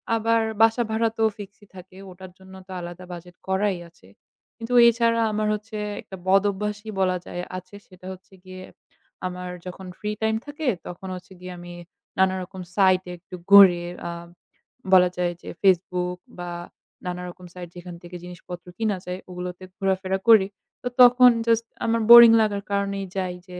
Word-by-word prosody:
আবার 225 Hz, 0 st, +2 dB, 0.2 s
বাসা 225 Hz, +2 st, +4 dB
ভাড়া 225 Hz, +1 st, +1 dB
তো 225 Hz, -, +1 dB
fixed-ই 205 Hz, 0 st, -12 dB
থাকে। 185 Hz, 0 st, -13 dB
ওটার 185 Hz, 0 st, -12 dB
জন্য 190 Hz, 0 st, -16 dB
তো -, -, -12 dB
আলাদা 175 Hz, +1 st, -9 dB
budget 175 Hz, +1 st, -11 dB
করাই 190 Hz, 0 st, 0 dB
আছে। 165 Hz, -, -23 dB, 0.5 s
কিন্তু 230 Hz, +1 st, -5 dB
এছাড়া 230 Hz, 0 st, +2 dB
আমার 215 Hz, 0 st, -1 dB
হচ্ছে 215 Hz, +1 st, -6 dB, 0.2 s
একটা 190 Hz, -, -11 dB
বদ 195 Hz, +1 st, +4 dB
অভ্যাসই 210 Hz, +2 st, -5 dB
বলা 185 Hz, -1 st, +1 dB
যায় 175 Hz, -, -6 dB, 0.2 s
আছে 185 Hz, +2 st, -11 dB
সেটা 185 Hz, -1 st, -17 dB
হচ্ছে 190 Hz, +1 st, -17 dB
গিয়ে 185 Hz, 0 st, -10 dB, 0.6 s
আমার 180 Hz, 0 st, -7 dB, 0.2 s
যখন 185 Hz, +1 st, -8 dB
free 210 Hz, 0 st, -3 dB
time 220 Hz, 0 st, +1 dB
থাকে। 290 Hz, 0 st, -6 dB, 0.2 s
তখন 180 Hz, +2 st, -8 dB
হচ্ছে 185 Hz, +1 st, -12 dB
গিয়ে 180 Hz, 0 st, -8 dB
আমি 175 Hz, 0 st, -10 dB, 0.5 s
নানারকম 190 Hz, 0 st, 0 dB
site-এ 185 Hz, -2 st, +3 dB
একটু 180 Hz, +1 st, -12 dB, 0.2 s
ঘুরে 185 Hz, -4 st, +8 dB, 0.3 s
আ -, -, -4 dB, 0.8 s
বলা 180 Hz, -1 st, +7 dB
যায় 175 Hz, -1 st, 0 dB
যে -, -, -9 dB
Facebook 180 Hz, -1 st, +1 dB, 0.2 s
বা 175 Hz, 0 st, -5 dB, 0.6 s
নানারকম 180 Hz, 0 st, -6 dB
site 175 Hz, -2 st, -9 dB
যেখান 175 Hz, 0 st, -9 dB
থেকে 175 Hz, +1 st, -10 dB
জিনিসপত্র 180 Hz, 0 st, -10 dB
কিনা 215 Hz, -3 st, -1 dB
যায় 180 Hz, +1 st, -5 dB
ওগুলোতে 180 Hz, +1 st, -7 dB
ঘোরাফেরা 190 Hz, -1 st, -1 dB
করি। 215 Hz, -4 st, +7 dB, 0.4 s
তো -, -, -2 dB
তখন 250 Hz, 0 st, +8 dB, 0.2 s
just 230 Hz, 0 st, +2 dB, 0.2 s
আমার 230 Hz, 0 st, +1 dB
boring 235 Hz, -1 st, +11 dB
লাগার 205 Hz, -2 st, -1 dB
কারণেই 200 Hz, -1 st, -1 dB
যাই 185 Hz, -1 st, -2 dB
যে 180 Hz, -1 st, -9 dB
190 Hz, 165 wpm, -24 LUFS, 180-210 Hz, 0.8 s, boring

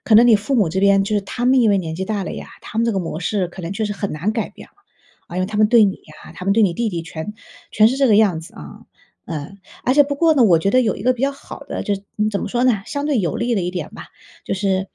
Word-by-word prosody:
可 220 Hz, -, +2 dB
能 230 Hz, +3 st, +8 dB
你 230 Hz, -, +6 dB
父 215 Hz, +7 st, -3 dB
母 205 Hz, -9 st, +3 dB
这 190 Hz, +3 st, -1 dB
边 200 Hz, 0 st, +4 dB
就 210 Hz, -, -2 dB
是 205 Hz, -, +2 dB
他 240 Hz, +5 st, -5 dB
们 255 Hz, +1 st, +4 dB
因 225 Hz, -, +4 dB
为 200 Hz, -, +3 dB
年 160 Hz, -3 st, -4 dB
纪 190 Hz, +3 st, -3 dB
大 205 Hz, -3 st, -2 dB
了 -, -, -5 dB
呀， -, -, -8 dB
他 220 Hz, -, -6 dB
们 230 Hz, -, +3 dB
这 -, -, +2 dB
个 195 Hz, -, -1 dB
模 165 Hz, -2 st, -4 dB
式 185 Hz, 0 st, -1 dB
可 180 Hz, +1 st, -10 dB
能 165 Hz, -, -5 dB
就 215 Hz, +2 st, -2 dB
是 205 Hz, -, -2 dB
很 200 Hz, 0 st, -4 dB
难 170 Hz, +8 st, -2 dB
改 225 Hz, 0 st, -2 dB
变。 -, -, -14 dB, 0.6 s
呃， 185 Hz, +2 st, -2 dB
他 210 Hz, +1 st, -5 dB
们 210 Hz, 0 st, +4 dB
对 230 Hz, -2 st, +6 dB
你 195 Hz, -, +1 dB, 0.3 s
啊， -, -, -12 dB
他 180 Hz, -, -9 dB
们 195 Hz, -, +2 dB
对 225 Hz, -, +3 dB
你 180 Hz, -4 st, +2 dB
弟 235 Hz, -1 st, -1 dB
弟 170 Hz, -5 st, -4 dB
全 165 Hz, +5 st, -7 dB, 0.4 s
全 215 Hz, -, +5 dB
是 255 Hz, +4 st, +1 dB
这 275 Hz, -1 st, +3 dB
个 210 Hz, -, +5 dB
样 195 Hz, -7 st, +3 dB
子 165 Hz, -, -14 dB
啊。 75 Hz, -1 st, -11 dB, 0.5 s
嗯， 165 Hz, +5 st, -6 dB, 0.3 s
而 255 Hz, -, +2 dB
且 290 Hz, -, +7 dB
不 285 Hz, 0 st, -3 dB
过 325 Hz, 0 st, +3 dB
呢， 265 Hz, -, +4 dB
我 180 Hz, -7 st, +5 dB
觉 195 Hz, +5 st, 0 dB
得 255 Hz, -, +5 dB
有 220 Hz, -5 st, 0 dB
一 -, -, -8 dB
个 255 Hz, -, +4 dB
比 250 Hz, +1 st, -7 dB
较 275 Hz, -, +2 dB
好 275 Hz, -, -11 dB
的 -, -, -6 dB
就 205 Hz, -, 0 dB
是 195 Hz, -, -8 dB, 0.3 s
怎 200 Hz, -, -1 dB
么 -, -, -4 dB
说 245 Hz, 0 st, 0 dB
呢？ 230 Hz, -6 st, +2 dB
相 285 Hz, +3 st, -4 dB
对 280 Hz, -7 st, +1 dB
有 170 Hz, -6 st, -2 dB
利 235 Hz, 0 st, 0 dB
的 195 Hz, -, 0 dB
一 175 Hz, -, -2 dB
点 180 Hz, -4 st, -5 dB
吧， -, -, -10 dB, 0.4 s
就 -, -, -2 dB
是 190 Hz, -1 st, -1 dB
205 Hz, 335 characters per minute, -20 LUFS, 185-235 Hz, 0.6 s, 能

